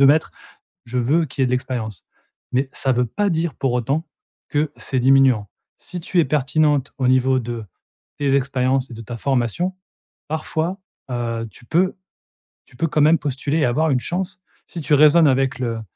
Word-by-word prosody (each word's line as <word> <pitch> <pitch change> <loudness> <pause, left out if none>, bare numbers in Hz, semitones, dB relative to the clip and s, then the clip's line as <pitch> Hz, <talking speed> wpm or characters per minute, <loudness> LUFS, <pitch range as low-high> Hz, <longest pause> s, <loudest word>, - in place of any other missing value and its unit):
de - - +7
mettre: 155 +3 +3 0.5
«Je 120 +2 -4
veux 145 +8 +2
qu'il 135 -1 -5
y - - +5
ait - - +2
de - - -2
l'expérience.». 120 -5 -3 0.5
Mais, 130 +2 +1
ça 135 - 0
veut 125 0 +2
pas 205 - -1
dire 165 -2 -1
pour 135 -2 -1
autant 135 +7 0 0.4
que 150 0 0
c'est 130 - -2
diminuant. 130 -5 +4 0.3
Si 180 - -7
tu 175 +2 0
es 165 - +4
pertinente 145 0 +1
au 130 - +2
niveau 130 0 +3
de 120 -1 -5 0.5
tes 140 -2 +2
expériences 130 -1 0
et - - -8
de 115 - -8
ta 115 +2 -7
formation, 135 - 0 0.6
parfois, 160 +4 -2 0.3
heu, 115 -1 -2
tu 105 - -17
peux 180 +8 +1 0.7
tu - - -21
peux 165 - +1
quand 150 0 +1
même 155 +3 +6
postuler 145 +2 -2
et - - +3
avoir 150 +7 +1
une 125 - +2
chance. 185 +4 -3 0.3
Si 170 - -7
tu 150 +1 0
raisonnes 155 +2 +6
avec 135 -1 +1
le 115 -3 -2
135 Hz, 190 wpm, -21 LUFS, 125-155 Hz, 0.7 s, de